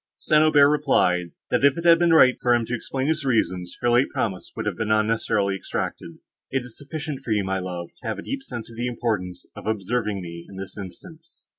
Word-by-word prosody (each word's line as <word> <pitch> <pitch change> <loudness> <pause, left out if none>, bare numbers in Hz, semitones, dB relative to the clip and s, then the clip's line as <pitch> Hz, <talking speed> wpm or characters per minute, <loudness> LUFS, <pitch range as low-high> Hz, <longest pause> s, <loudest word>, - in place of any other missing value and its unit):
St. 155 0 +3
Aubert 150 -2 +6
replied, 135 - +2 0.2
that, 125 - +2
if 140 +1 +5
it 170 - -4
had 165 -1 +7
been 175 -1 +3
right 130 -6 +7
for 120 -1 +4
him 120 -1 0
to 120 - -5
explain 130 +3 -3
his 155 0 0
reasons, 95 -8 0
her 120 - +2
late 120 +3 +4
promise 95 -5 -3
would - - -4
have - - -1
been 115 -2 -3
unnecessarily 110 -2 +1
exacted. 85 -3 -5 0.3
"It 135 -1 -1
is 125 - -12
sufficient 150 -1 -5
for - - -10
you, 105 -2 +2
my 95 0 -1
love, 90 -2 -5
to 120 - -7
have 110 - -2
a - - -7
deep 275 0 -4
sense 120 - -7
of 115 - -13
the 120 +1 -1
importance 105 -7 -3
of - - -9
observing 110 0 -1
me 85 -1 -8
in 100 - -11
this 95 0 -7
instance." 160 - -11
120 Hz, 230 wpm, -24 LUFS, 95-140 Hz, 0.3 s, had